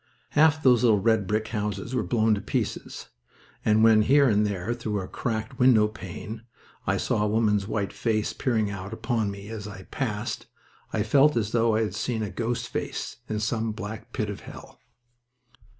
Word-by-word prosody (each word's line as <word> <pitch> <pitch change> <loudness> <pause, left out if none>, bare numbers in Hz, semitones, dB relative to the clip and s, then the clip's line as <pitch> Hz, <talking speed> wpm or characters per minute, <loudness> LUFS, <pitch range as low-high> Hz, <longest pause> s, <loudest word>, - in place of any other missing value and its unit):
Half 155 +1 +4
those 125 -3 +5
little 110 -4 +5
red 110 -1 +2
brick 110 +1 -1
houses 105 +1 -3
were 125 - +1
blown 110 -1 +2
to 100 - -1
pieces, - - -3 0.5
and 110 0 +4
when 110 -1 +6
here 140 +5 +5
and 105 -2 +3
there 100 +3 -2
through 110 -4 -3
a 95 - -5
cracked 115 +1 -4
window 120 -4 +6
pane 105 +2 -8 0.5
I - - +2
saw - - 0
a 105 - +2
woman's 105 -2 +2
white 100 -3 -2
face 110 -2 0
peering 110 -6 0
out 100 +2 -6
upon 115 -2 -1
me 100 +1 -8
as 110 -2 -6
I 100 -2 -9
passed 115 -3 -3 0.4
I 105 - 0
felt 140 +4 +4
as 110 -2 0
though 115 -1 +3
I 110 - +2
had 105 - -3
seen 110 +1 -2
a 105 - -4
ghost 120 0 -2
face - - -4
in 110 - -1
some 110 0 -1
black 110 +1 -7
pit 105 -4 -2
of 100 - -7
hell. - - -12
110 Hz, 185 wpm, -26 LUFS, 105-115 Hz, 0.5 s, when